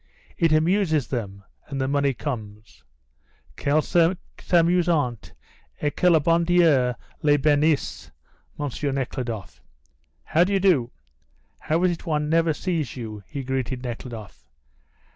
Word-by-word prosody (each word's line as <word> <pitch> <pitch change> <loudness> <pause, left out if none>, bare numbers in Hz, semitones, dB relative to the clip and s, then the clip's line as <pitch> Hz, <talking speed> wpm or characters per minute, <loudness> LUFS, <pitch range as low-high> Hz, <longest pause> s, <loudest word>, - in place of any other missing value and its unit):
"It 165 -3 +2
amuses 155 - +2
them, 100 -6 -4 0.2
and 140 -2 -5
the 130 - 0
money 140 -1 +1
comes." 105 - -7 0.7
"Qu'elles 150 +2 +1 0.5
s'amusent 170 - +1 0.5
et 145 -1 -1
que 180 - +3
le 165 -2 +5
bon 165 +3 +2
dieu 160 -8 +3 0.3
les 145 -1 +4
benisse. 150 +1 +1 0.5
M. 145 - -1 0.3
Nekhludoff! 115 - -4 0.6
How 165 - +3
d'you 195 +1 +1
do? 170 -11 +3 0.7
How 165 +3 0
is 180 - +4
it 170 - -7
one 150 -1 0
never 165 0 +3
sees 165 -1 -2
you?" 110 -3 -6
he 140 -2 -5
greeted 130 -1 -3
Nekhludoff. 115 - -8
145 Hz, 125 wpm, -24 LUFS, 125-165 Hz, 0.7 s, le